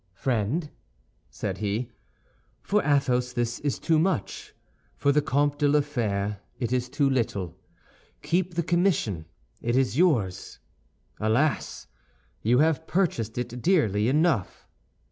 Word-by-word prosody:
"Friend," 130 Hz, -, -1 dB, 0.6 s
said -, -, -4 dB
he, 110 Hz, +4 st, -2 dB, 0.7 s
"for 210 Hz, +1 st, +2 dB
Athos 125 Hz, -4 st, +1 dB
this 120 Hz, -1 st, -1 dB
is 145 Hz, -2 st, -1 dB
too 160 Hz, -2 st, +2 dB
much; 175 Hz, -, -2 dB, 0.4 s
for 140 Hz, -, +2 dB
the 150 Hz, +1 st, +3 dB
Comte 145 Hz, +1 st, +1 dB
de 145 Hz, -, +3 dB
la 150 Hz, +1 st, +4 dB
Fère 105 Hz, -8 st, -2 dB, 0.2 s
it 120 Hz, -1 st, -1 dB
is 125 Hz, 0 st, 0 dB
too 140 Hz, +1 st, +1 dB
little. 110 Hz, -, -1 dB, 0.7 s
Keep 175 Hz, +3 st, 0 dB
the 170 Hz, -, +1 dB
commission; 165 Hz, -, +1 dB, 0.4 s
it 120 Hz, +2 st, 0 dB
is 130 Hz, 0 st, +1 dB
yours. 115 Hz, -, +1 dB, 0.6 s
Alas! 120 Hz, +8 st, 0 dB, 0.6 s
you 120 Hz, +3 st, +3 dB
have 160 Hz, +2 st, +2 dB
purchased 120 Hz, -, 0 dB
it 125 Hz, 0 st, -4 dB
dearly 115 Hz, -, +2 dB
enough." 150 Hz, -, +1 dB
130 Hz, 125 wpm, -26 LUFS, 115-155 Hz, 0.7 s, la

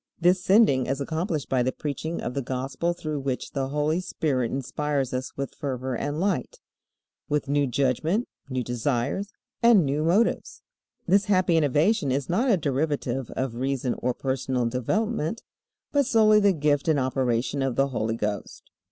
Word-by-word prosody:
This 180 Hz, +2 st, +3 dB
sending 190 Hz, -, +4 dB
is 135 Hz, -, -1 dB
accomplished 160 Hz, +1 st, -2 dB
by 130 Hz, -2 st, +1 dB
the 130 Hz, +1 st, +1 dB
preaching 155 Hz, +4 st, -4 dB
of 120 Hz, -, -4 dB
the 140 Hz, -, -1 dB
Gospel 130 Hz, +6 st, -2 dB
through 155 Hz, -3 st, -4 dB
which 135 Hz, -2 st, -3 dB
the 135 Hz, -2 st, -2 dB
Holy 150 Hz, +3 st, 0 dB
Spirit 135 Hz, -9 st, -1 dB
inspires 140 Hz, 0 st, -2 dB
us 130 Hz, +1 st, -4 dB
with 140 Hz, -1 st, -4 dB
fervor 130 Hz, -2 st, -3 dB
and 145 Hz, +5 st, -3 dB
light, 185 Hz, -9 st, -1 dB, 0.7 s
with 145 Hz, -1 st, 0 dB
new 145 Hz, 0 st, +2 dB
judgment, 140 Hz, -, 0 dB, 0.2 s
new 130 Hz, -1 st, -1 dB
desires, 120 Hz, -, -1 dB, 0.3 s
and 230 Hz, -8 st, +6 dB
new 145 Hz, +2 st, 0 dB
motives. 190 Hz, +8 st, +1 dB, 0.4 s
This 195 Hz, +2 st, +4 dB
happy 185 Hz, -3 st, +3 dB
innovation 155 Hz, -, +2 dB
is 135 Hz, 0 st, -1 dB
not 230 Hz, +10 st, +2 dB
a 210 Hz, -, +4 dB
derivative 140 Hz, -4 st, -1 dB
of 130 Hz, -2 st, -2 dB
reason 130 Hz, 0 st, -1 dB
or 125 Hz, 0 st, -1 dB
personal 130 Hz, -2 st, -1 dB
development, 180 Hz, -, -1 dB, 0.5 s
but 285 Hz, -3 st, +2 dB
solely 215 Hz, -4 st, +5 dB
the 200 Hz, -1 st, +4 dB
gift 150 Hz, -3 st, +1 dB
and 155 Hz, -3 st, +3 dB
operation 130 Hz, 0 st, 0 dB
of 135 Hz, -2 st, 0 dB
the 135 Hz, 0 st, +2 dB
Holy 115 Hz, -3 st, -1 dB
Ghost. 105 Hz, -2 st, -5 dB
140 Hz, 160 wpm, -26 LUFS, 130-170 Hz, 0.7 s, and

